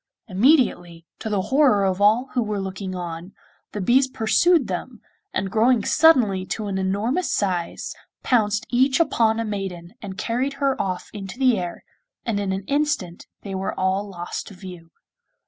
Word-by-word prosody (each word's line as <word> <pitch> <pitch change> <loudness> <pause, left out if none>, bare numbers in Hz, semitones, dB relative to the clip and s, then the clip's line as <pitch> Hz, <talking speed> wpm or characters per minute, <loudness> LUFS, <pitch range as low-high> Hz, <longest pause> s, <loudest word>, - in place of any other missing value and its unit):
Immediately, 190 - +2
to 220 - -4
the 200 -3 0
horror 260 -9 +4
of 190 0 0
all 225 +6 +3
who 250 - +1
were 210 -2 -2
looking 190 0 -5
on, 175 +1 -6 0.4
the 210 - -5
bees 250 +7 +3
pursued 265 +6 +3
them, 210 +6 -5 0.3
and, 190 0 -2
growing 225 0 +3
suddenly 245 -12 +4
to 215 - -3
an 195 -1 -2
enormous 210 - 0
size, 180 -4 -2 0.3
pounced 210 -4 +1
each 260 +3 +3
upon 225 -8 +2
a 230 - -1
maiden 190 -4 -5
and 195 -3 -7
carried 255 +4 -1
her 275 -1 0
off 185 -2 -4
into 195 +1 -7
the 255 -3 +4
air, 175 -1 -6 0.4
and 220 -4 -1
in 200 -1 -1
an 190 +1 -3
instant 285 - -1 0.2
they 195 - -6
were 190 0 -3
all 190 +2 0
lost 175 -2 -6
to 200 - -11
view. 180 -3 -11
205 Hz, 165 wpm, -23 LUFS, 190-250 Hz, 0.4 s, horror